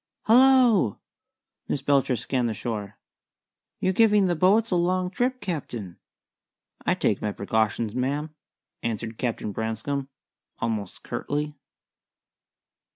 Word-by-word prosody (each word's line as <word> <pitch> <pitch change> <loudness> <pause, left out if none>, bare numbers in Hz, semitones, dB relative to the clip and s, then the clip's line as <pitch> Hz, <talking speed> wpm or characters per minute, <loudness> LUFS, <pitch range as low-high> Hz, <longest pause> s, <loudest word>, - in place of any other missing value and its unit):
"Hallo!" 245 - +5 0.7
Miss 140 - -2
Belcher 135 -2 +3
scanned 125 +1 -1
the 110 - -3
shore. 105 -4 -5 0.8
"You're 185 - +1
giving 210 -1 +5
the 175 -2 +1
boats 200 +7 +3
a - - +3
long 180 +1 +1
trip, 250 +5 0
Captain." 125 - -5 0.8
"I - - +2
take - - 0
my 105 - -1
precautions, 110 +2 0
ma'am," 145 +5 -2 0.5
answered 110 0 -4
Captain 115 -3 -2
Branscome, 115 +6 -3 0.5
almost 110 -4 -3
curtly. 150 +1 -3
140 Hz, 110 wpm, -25 LUFS, 110-185 Hz, 0.8 s, Hallo